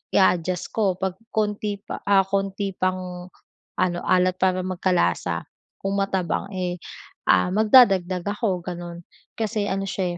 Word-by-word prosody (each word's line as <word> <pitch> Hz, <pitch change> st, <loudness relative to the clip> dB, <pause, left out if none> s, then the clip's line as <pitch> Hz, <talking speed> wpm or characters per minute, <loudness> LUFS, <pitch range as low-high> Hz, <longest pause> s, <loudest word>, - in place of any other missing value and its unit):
i-a-adjust 180 Hz, -2 st, +2 dB
ko 200 Hz, -5 st, +1 dB
'pag 190 Hz, +1 st, -3 dB, 0.2 s
konti 210 Hz, -1 st, -1 dB
pa -, -, -6 dB
ah, 195 Hz, -1 st, +5 dB
konti 195 Hz, +1 st, -2 dB
pang 185 Hz, -1 st, -2 dB, 0.5 s
ano 175 Hz, -1 st, 0 dB
alat 185 Hz, 0 st, +3 dB
para 185 Hz, -1 st, +2 dB
magkalasa 180 Hz, -, 0 dB, 0.4 s
kung 200 Hz, 0 st, +1 dB
matabang 190 Hz, -1 st, -1 dB
eh, 180 Hz, -2 st, -3 dB, 0.5 s
ah, 90 Hz, -, +4 dB
magdadagdag 195 Hz, -5 st, +5 dB
ako 205 Hz, -2 st, 0 dB
ganun. 175 Hz, -1 st, -7 dB, 0.3 s
Kasi 215 Hz, -2 st, -1 dB
ano 195 Hz, 0 st, -1 dB
siya 180 Hz, -2 st, -2 dB
185 Hz, 130 wpm, -24 LUFS, 180-200 Hz, 0.5 s, ah